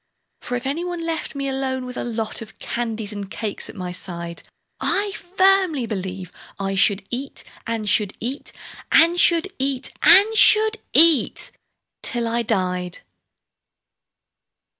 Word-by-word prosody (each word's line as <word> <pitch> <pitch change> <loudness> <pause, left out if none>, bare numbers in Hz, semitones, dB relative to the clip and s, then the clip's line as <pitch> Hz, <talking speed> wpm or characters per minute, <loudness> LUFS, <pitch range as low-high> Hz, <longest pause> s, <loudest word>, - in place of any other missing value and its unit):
For 245 - -4
if 245 - -8
any 290 +6 -2
one 350 -2 -5
left 325 -2 -4
me 275 0 -3
alone 265 -1 -3
with 250 0 -8
a - - -4
lot 225 -2 -2
Of 220 -1 -11
candies 225 -3 -4
and 200 -2 -7
cakes 210 +1 -5
at - - -11
my 180 -3 -5
side, 170 -2 -7 0.4
I 405 +1 0
firmly 375 -6 +1
believe 190 -4 -5 0.3
I 195 0 -2
should 195 +1 +1
eat, 265 +3 -5 0.2
and 225 -2 -3
should 205 0 +1
eat, 260 +5 -5 0.4
And 335 +2 +5
should 345 +3 +3
eat, 270 -1 -2
and 425 +3 +7
should 435 0 +5
eat, 320 -4 +4 0.5
till 240 -1 -1
I 235 +1 0
died. 180 -5 -2
240 Hz, 140 wpm, -21 LUFS, 205-330 Hz, 0.5 s, and